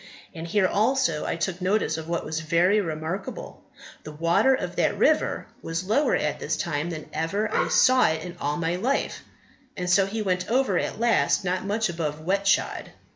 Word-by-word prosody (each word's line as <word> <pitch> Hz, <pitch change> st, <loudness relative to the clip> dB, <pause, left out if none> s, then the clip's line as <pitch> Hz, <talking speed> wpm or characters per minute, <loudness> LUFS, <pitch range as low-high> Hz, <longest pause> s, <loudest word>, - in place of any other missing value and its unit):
And 165 Hz, -1 st, -7 dB
here 190 Hz, +3 st, +2 dB
also 215 Hz, -, +1 dB
I -, -, -1 dB
took 170 Hz, +2 st, -3 dB
notice 190 Hz, -3 st, +1 dB
of 160 Hz, 0 st, -7 dB
what 170 Hz, -1 st, -2 dB
was 160 Hz, +1 st, -3 dB
very 175 Hz, +6 st, +2 dB
remarkable; 170 Hz, -, -5 dB, 0.4 s
the 155 Hz, -, -8 dB
water 170 Hz, -, +3 dB
of -, -, -5 dB
that -, -, +1 dB
river -, -, +2 dB, 0.2 s
was 165 Hz, +2 st, -3 dB
lower 225 Hz, +10 st, +2 dB
at -, -, -1 dB
this -, -, -2 dB
time 155 Hz, -1 st, -2 dB
than 155 Hz, -3 st, -6 dB
ever 200 Hz, +7 st, -1 dB
I -, -, +2 dB
saw 255 Hz, 0 st, +5 dB
it 160 Hz, 0 st, -1 dB
in 180 Hz, -1 st, -8 dB
all 145 Hz, +1 st, -1 dB
my 170 Hz, +1 st, -1 dB
life, 255 Hz, +9 st, -1 dB, 0.6 s
so 190 Hz, +2 st, +3 dB
he 215 Hz, +2 st, -3 dB
went 180 Hz, -2 st, -1 dB
over 260 Hz, +3 st, +2 dB
at -, -, -4 dB
last 230 Hz, -4 st, +2 dB
not 185 Hz, +1 st, -1 dB
much 215 Hz, +2 st, 0 dB
above 160 Hz, -3 st, -3 dB
wet 195 Hz, +5 st, -1 dB
shod." -, -, +1 dB
180 Hz, 185 wpm, -25 LUFS, 165-210 Hz, 0.6 s, saw